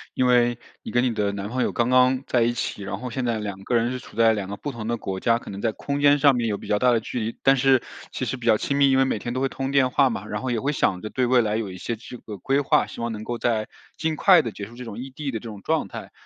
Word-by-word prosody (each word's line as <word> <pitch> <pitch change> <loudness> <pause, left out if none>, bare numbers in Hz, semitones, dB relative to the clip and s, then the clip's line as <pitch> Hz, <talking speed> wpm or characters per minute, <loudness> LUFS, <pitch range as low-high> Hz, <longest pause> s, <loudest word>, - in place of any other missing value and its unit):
因 130 - +2
为 120 -1 +3 0.2
你 - - -8
跟 120 +1 +2
你 125 - +1
的 105 -2 0
男 100 0 -4
朋 125 +2 -2
友 - - +1
刚 120 0 0
刚 130 +1 +4
在 120 - +1
一 115 +1 +3
起， 115 -3 -4
然 100 0 -5
后 125 +2 -6
现 130 +2 -3
在 120 -2 0
两 100 -2 -5
个 120 - -1
人 120 +1 +2
是 130 - -4
处 115 - -14
在 115 -1 +5
两 100 -3 -4
个 100 - -5
不 145 - -5
同 115 -3 -6
的 120 - -1
国 95 -3 -4
家， 115 +3 +2
可 120 - -9
能 100 - -7
在 115 - +1
空 140 +5 -4
间 145 0 +6
上 140 -1 +5
面 120 -1 0
有 105 -2 -1
比 - - -11
较 105 - +1
大 125 - +4
的 115 - +3
距 115 +2 -5
离。 115 0 -4
但 135 0 +6
是 135 -1 +3 0.3
其 - - -3
实 130 - -3
比 120 - -7
较 110 - +5
亲 140 - -2
密， 140 -1 +4
因 135 - +3
为 135 - +4
每 130 - -1
天 120 +3 -5
都 - - 0
会 135 - +1
通 135 0 -4
电 135 -2 +3
话 135 +1 +4
嘛， 105 -3 -5
然 - - -4
后 130 - -3
也 120 -2 0
会 140 +4 0
想 95 -10 +1
着 110 +3 -7
对 130 -1 +1
未 125 0 +4
来 105 0 0
有 110 -4 -3
一 90 - -8
些 115 +5 -3
这 125 +2 -10
个 105 -4 -9
规 135 +9 +1
划， 140 - +2
希 - - -10
望 115 0 -2
能 110 -1 -6
够 120 +1 -4
在 110 -3 0 0.3
尽 160 -1 -1
快 180 -1 +6
地 115 -6 -4
结 100 - -7
束 115 - -13
这 125 +1 -8
种 110 -2 -7
异 130 +3 -7
地 140 +2 -5
的 115 - -2
这 - - -19
种 105 -3 -9
状 - - 0
态， - - -9
120 Hz, 360 characters per minute, -24 LUFS, 110-130 Hz, 0.3 s, 间